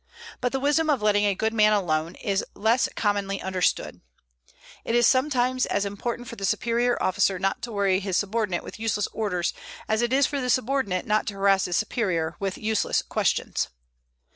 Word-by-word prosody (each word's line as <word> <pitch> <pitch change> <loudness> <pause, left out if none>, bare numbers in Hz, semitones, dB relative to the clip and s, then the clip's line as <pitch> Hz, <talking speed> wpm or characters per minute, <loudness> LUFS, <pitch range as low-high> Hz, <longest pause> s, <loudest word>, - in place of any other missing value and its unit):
But 245 - -1
the 270 - -1
wisdom 295 +3 +2
of 275 -7 +1
letting 205 -1 +3
a 200 -1 +2
good 220 +3 -1
man 215 -1 +4
alone 165 -4 0
is 200 -4 -1
less 225 +4 +2
commonly 200 -2 0
understood. 185 -1 -1 0.8
It 230 - -1
is 240 0 +5
sometimes 255 -1 +2
as 200 0 0
important 235 +4 -4
for 235 - -7
the 195 - -7
superior 235 +5 +1
officer 190 0 +1
not 195 +6 -1
to 240 -1 -5
worry 200 -3 +2
his 190 -2 -1
subordinate 205 -3 -1
with - - -10
useless 215 -2 0
orders 180 -6 -1 0.3
as 220 +1 +1
it 240 0 0
is 275 +1 +4
for 280 0 -2
the 250 - -2
subordinate 250 -7 0
not 215 0 +1
to 205 - -3
harass 195 -1 +3
his 175 - 0
superior 185 -8 -1
with 195 -1 -3
useless 220 0 0
questions. - - -1
210 Hz, 185 wpm, -25 LUFS, 195-240 Hz, 0.8 s, is